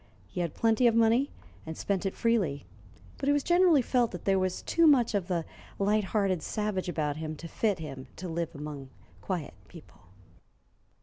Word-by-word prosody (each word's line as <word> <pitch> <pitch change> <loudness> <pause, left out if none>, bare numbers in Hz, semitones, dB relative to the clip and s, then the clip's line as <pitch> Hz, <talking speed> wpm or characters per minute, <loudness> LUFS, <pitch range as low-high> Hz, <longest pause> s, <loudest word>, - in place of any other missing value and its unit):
He 100 - -5
had 170 -3 -3
plenty 225 +2 +3
of 230 - +3
money, 230 +4 +4 0.3
and 160 0 -7
spent 195 -1 -1
it 190 - -4
freely; 195 - 0 0.5
but 275 - 0
it - - +5
was 290 -1 +1
generally 345 -5 +4
felt 245 -1 +2
that 180 - -8
there 195 -1 +3
was 185 -1 -2
too 335 -1 +3
much 250 -6 +4
of 195 -4 -1
the 170 -3 -1 0.3
light 205 +1 +2
hearted 195 -4 0
savage 210 0 -2
about 150 -4 -1
him 155 0 -4
to 165 +3 -8
fit 205 +3 0
him 135 -5 -8
to 185 - -6
live 170 0 -3
among 145 -2 -7 0.3
quiet 175 -6 -4
people. 165 -3 -15
190 Hz, 185 wpm, -29 LUFS, 160-230 Hz, 0.5 s, it